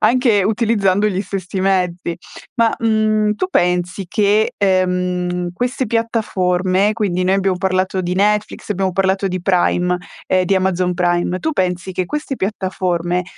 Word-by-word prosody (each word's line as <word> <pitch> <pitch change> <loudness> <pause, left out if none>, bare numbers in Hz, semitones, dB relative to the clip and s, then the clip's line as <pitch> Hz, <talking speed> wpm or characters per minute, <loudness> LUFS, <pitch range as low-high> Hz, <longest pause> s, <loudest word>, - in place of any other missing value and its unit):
anche 235 -6 +3
utilizzando 210 -2 +2
gli 190 -1 -2
stessi 190 -1 -4
mezzi. 180 -3 0 0.4
Ma, 230 -3 +2
mhmm, 215 -1 +2
tu 370 - -2
pensi 180 - 0
che, 210 +1 +2
ehm, 180 -2 0
queste 245 +6 -2
piattaforme 200 -4 +1
quindi, 190 -5 -1
noi 190 +1 +3
abbiamo 190 -1 +1
parlato 190 0 0
di 180 0 -2
Netflix, 210 +2 0
abbiamo 190 -1 0
parlato 195 +1 +1
di 185 -2 -3
Prime 180 -1 +2 0.3
ehm, 185 -1 +2
di 195 - +1
Amazon 185 -1 +1
Prime, 175 0 0
tu 320 - -1
pensi 180 - -1
che 185 -1 -2
queste 295 +1 -4
piattaforme 180 -3 -1
190 Hz, 145 wpm, -18 LUFS, 180-210 Hz, 0.4 s, anche